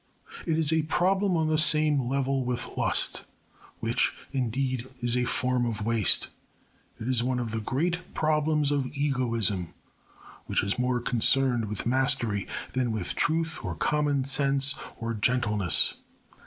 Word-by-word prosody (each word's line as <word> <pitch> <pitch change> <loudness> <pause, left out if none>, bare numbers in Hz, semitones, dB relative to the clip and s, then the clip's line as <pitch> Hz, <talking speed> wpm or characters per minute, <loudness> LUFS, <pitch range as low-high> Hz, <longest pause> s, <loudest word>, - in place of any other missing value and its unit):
It 160 -1 +1
is 160 -1 +2
a 160 - +3
problem 185 +4 +1
on 160 -1 +1
the 155 0 +1
same 150 -2 +4
level 135 0 0
with 125 0 -4
lust, - - +2 0.6
which, - - +1 0.2
indeed, 130 -1 -2
is 120 0 +1
a 125 0 +1
form 125 0 0
of 110 -3 -3
waste. 115 -3 +2 0.7
It 115 - -6
is 130 -3 +2
one 125 +1 -1
of 120 -3 -3
the 115 - -2
great 165 +11 -1 0.2
problems 150 -1 +1
of 140 -3 0
egoism, 115 - -1 0.7
which - - 0
is 100 +5 -1
more 125 -1 0
concerned 120 0 +2
with 105 -1 -4
mastery 120 -5 +1 0.3
than 125 -2 0
with 105 -5 -3
truth 160 0 0
or - - -4
common 145 -2 0
sense 140 +1 +3 0.2
or 115 0 -3
gentleness. 105 -4 +2
130 Hz, 145 wpm, -27 LUFS, 115-150 Hz, 0.7 s, same